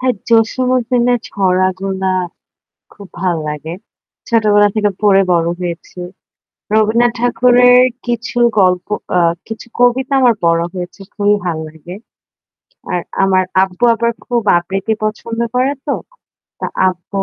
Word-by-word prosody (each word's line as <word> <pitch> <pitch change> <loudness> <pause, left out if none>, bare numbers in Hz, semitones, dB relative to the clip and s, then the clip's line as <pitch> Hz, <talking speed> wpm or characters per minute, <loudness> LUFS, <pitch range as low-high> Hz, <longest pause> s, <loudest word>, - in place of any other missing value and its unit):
হ্যাঁ, 255 -2 +1
জসিম 230 +3 +2
উদ্দিনের 245 0 +1
ছড়া 185 -1 +1
গুলা 190 -1 -2 0.8
খুব 200 -2 -13
ভাল 180 -3 0
লাগে। 150 +3 -5 0.5
ছোটবেলা 210 -3 +3
থেকে 210 -1 +1
পড়ে 195 -2 +5
বড় 170 -1 +1
হয়েছি। 175 +1 -6 0.7
রবীন্দ্রনাথ 220 +3 +3
ঠাকুরের 245 +1 +5 0.3
কিছু 240 +1 -3 0.2
গল্প 180 -1 +2 0.2
অ্যা 180 - +2 0.3
কিছু 225 +1 -8
কবিতা 255 +3 +2
আমার 240 -3 +4
পড়া 170 0 +2
হয়েছে। 180 +2 -7
খুবই 205 0 +2
ভাল 170 -3 -1
লাগে। 160 +3 -11 1.0
আর 175 - 0 0.2
আমার 190 -1 +3 0.2
আব্বু 190 +4 -1
আবার 235 +1 0 0.2
খুব 240 -1 0 0.2
আবৃতি 195 +5 -3
পছন্দ 225 +2 -4
করে 255 +3 +1
তো। 280 - 0 0.7
তো - - -2 0.2
আব্বু 185 +2 -4
205 Hz, 130 wpm, -15 LUFS, 185-240 Hz, 1.0 s, পড়ে